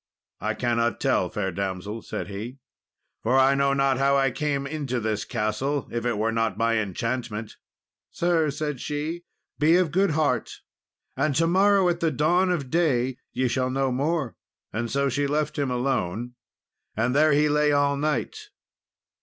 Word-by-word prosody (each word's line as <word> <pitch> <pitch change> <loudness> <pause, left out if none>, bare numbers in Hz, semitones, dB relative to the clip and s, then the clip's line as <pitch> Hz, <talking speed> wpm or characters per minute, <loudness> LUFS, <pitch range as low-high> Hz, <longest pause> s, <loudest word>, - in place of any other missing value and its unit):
"I - - -2
cannot 120 -2 0
tell, - - +1
fair 95 -2 -2
damsel," 100 +4 -4
said 90 - -5
he, 110 +6 -6 0.6
"for 125 +4 +2
I 135 +1 +5
know 140 0 +2
not 135 -1 +2
how 140 0 +3
I 135 -1 +2
came 140 0 -1
into 140 -4 -3
this 110 -2 -2
castle, 120 +6 -2
if 120 0 -2
it 120 -3 0
were 110 +2 +1
not 115 -1 0
by 115 0 +2
enchantment." 110 +1 -3 0.5
"Sir," 170 -3 +1
said 145 -2 -3
she, 155 +4 -4 0.3
"be 155 +3 +5
of 180 -4 +1
good 195 +4 +2
heart, 130 -7 0 0.5
and 155 -3 0
to 165 +4 +3
morrow 195 +2 +4
at 175 -1 0
the 165 - +2
dawn 170 +6 +2
of 145 -8 -2
day, 130 -7 +1
ye 130 - 0
shall 130 +1 0
know 135 0 0
more." 140 0 -1 0.4
And 115 +1 -2
so 140 +2 +1
she 140 +2 0
left 150 +1 -1
him 140 -2 0
alone, 120 -3 -1 0.6
and 120 +4 +1
there 155 0 +5
he 150 +1 +4
lay 150 0 +3
all 145 0 +2
night. 155 - -2
135 Hz, 170 wpm, -25 LUFS, 120-150 Hz, 0.6 s, I